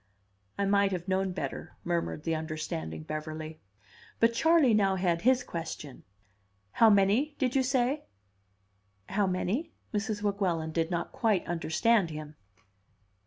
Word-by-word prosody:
"I 200 - +1
might 200 0 +3
have 175 0 -4
known 190 0 +1
better," 180 - -5
murmured 170 -3 -2
the 165 - 0
understanding 155 - -4
Beverly. 155 - -6 0.6
But 230 0 +4
Charley 315 -1 +4
now 195 -2 +3
had 175 -3 0
his 255 +1 +3
question. 160 - -6 0.7
"How 230 - +6
many, 210 +9 +3
did 255 -2 0
you 270 - +4
say?" 260 +2 0 1.0
"How 200 0 +1
many?" 205 - -1 0.2
Mrs. 210 0 -2
Weguelin 185 -6 0
did 165 0 0
not 170 -1 -2
quite 215 -6 +1
understand 175 +4 +2
him. 155 -1 -7
190 Hz, 130 wpm, -29 LUFS, 160-230 Hz, 1.0 s, How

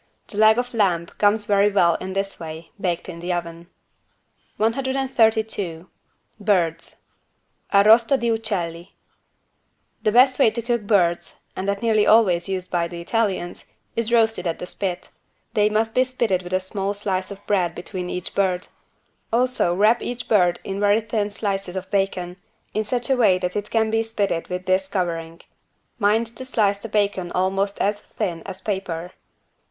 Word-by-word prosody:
The 205 - -4
leg 220 +1 +6
of 245 0 -2
lamb 185 -7 +2
comes 205 +1 +3
very 205 0 +3
well 175 -4 +4
in 185 +3 -5
this 195 0 -3
way, 160 0 -8
baked 175 -2 -1
in 170 - -8
the 175 +2 -3
oven. 170 0 -5 0.9
132 220 -7 0 0.5
BIRDS 175 -6 0 0.7
(Arrosto 225 +6 +5
di 235 0 +1
uccelli) 190 -6 -3 1.1
The 215 - +2
best 255 +3 +5
way 270 - +6
to 235 - -4
cook 235 -1 0
birds, 175 -5 +1
and 190 - -4
that 200 +2 -1
nearly 220 -2 +3
always 195 -5 +4
used 185 -1 -4
by 170 -1 +1
the 170 0 -8
Italians, 190 -2 -2 0.2
is 230 0 -1
roasted 225 -6 +2
at 165 - -2
the - - -6
spit. 180 -1 -4 0.4
They 210 0 +3
must 220 +1 0
be 255 - +4
spitted 235 -7 0
with 180 0 -8
a 185 - +3
small 195 +1 -3
slice 190 -2 -2
of 200 0 -10
bread 185 -4 +1
between 180 0 -5
each 180 0 -4
bird. 185 -1 0 0.6
Also 240 -7 +2
wrap 215 +5 +4
each 245 0 -5
bird 180 -5 +3
in 195 0 -4
very 205 +2 +3
thin 215 -2 -1
slices 195 -3 -3
of 190 0 -5
bacon, 190 -3 -1 0.4
in 215 - 0
such 245 +4 -1
a - - +5
way 210 -7 +4
that 180 0 -3
it 210 0 -3
can 220 -1 +1
be 225 0 +2
spitted 205 -6 -2
with 180 0 -5
this 185 +1 +1
covering. 170 -4 -3 0.6
Mind 215 +2 +3
to 235 +3 -7
slice 210 -6 +1
the 230 - -8
bacon 200 -4 0
almost 195 +2 0
as 205 +1 0
thin 170 -5 -4
as 190 -1 -7
paper. 180 -4 -3
200 Hz, 170 wpm, -22 LUFS, 180-220 Hz, 1.1 s, leg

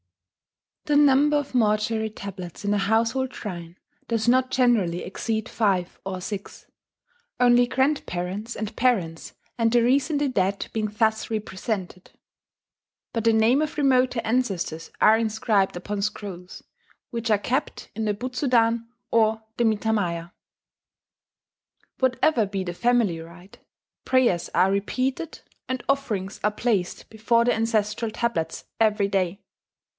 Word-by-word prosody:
The 295 - +1
number 290 +1 +5
of 290 -2 -4
mortuary 220 -1 +1
tablets 200 -4 -8
in 205 - +2
a 205 - +1
household 230 +5 +1
shrine 175 -4 -7 0.3
does 230 -1 -1
not 255 +1 +4
generally 235 -10 +2
exceed 220 +4 -3
five 195 -7 0
or 190 -1 -4
six, 200 +1 -7 0.7
only 245 0 +5
grandparents 230 -6 -1
and 215 0 -5
parents 190 -10 0 0.2
and 230 -1 +3
the 240 0 +4
recently 285 +4 +2
dead 200 -5 0
being 215 -1 0
thus 220 +1 0
represented; 195 -3 -4 1.0
but 230 -1 -2
the 230 - +6
name 225 +5 +4
of 310 0 -3
remoter 255 -4 +3
ancestors 195 -9 -1
are 220 +1 +6
inscribed 215 -3 +1
upon 200 +3 -4
scrolls, 200 -3 -5 0.5
which 230 -1 -3
are 210 - +4
kept 255 +7 -3
in 220 0 -2
the 210 -1 0
Butsudan 235 -1 +1 0.2
or 220 -1 +2
the 240 - +2
mitamaya. 205 -6 0 1.7
Whatever 255 -2 +2
be 195 -1 -3
the 175 -1 -4
family 235 -5 +1
rite, 170 +4 -13 0.4
prayers 250 -10 +2
are 190 +1 +4
repeated 255 +10 -2 0.3
and 255 -1 -2
offerings 215 -9 -1
are 210 - +4
placed 210 -4 -1
before 230 +2 +2
the 245 - +3
ancestral 225 0 0
tablets 215 -8 -2
every 210 -2 +3
day. 195 -1 -1
220 Hz, 130 wpm, -24 LUFS, 195-245 Hz, 1.7 s, the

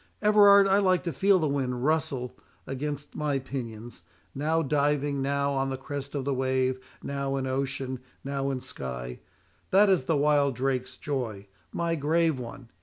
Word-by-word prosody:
Everard, 205 -1 +7
I 195 +1 +4
like 185 -3 +2
to 170 - -3
feel 195 +7 +4
the 160 -4 +1
wind 130 -3 -1
rustle 140 -5 0 0.3
against 145 +2 -5
my 150 -2 0
pinions,—now 135 +5 -4
diving, 145 -1 +1
now 140 +1 0
on 135 -1 0
the 135 - -3
crest 140 +1 -6
of 135 -2 -2
the 140 - 0
wave, 130 0 0 0.2
now 140 -1 -2
in 135 -1 -2
ocean, 130 -1 -2 0.2
now 140 0 -2
in 130 -2 -2
sky—that 65 - -2
is 175 -9 +2
the 155 +2 +2
wild 145 -2 +3
drake's 130 0 -2
joy, 120 -9 -3 0.3
my 170 -1 -1
grave 160 -1 +1
one! 125 0 -9
140 Hz, 155 wpm, -27 LUFS, 130-150 Hz, 0.3 s, Everard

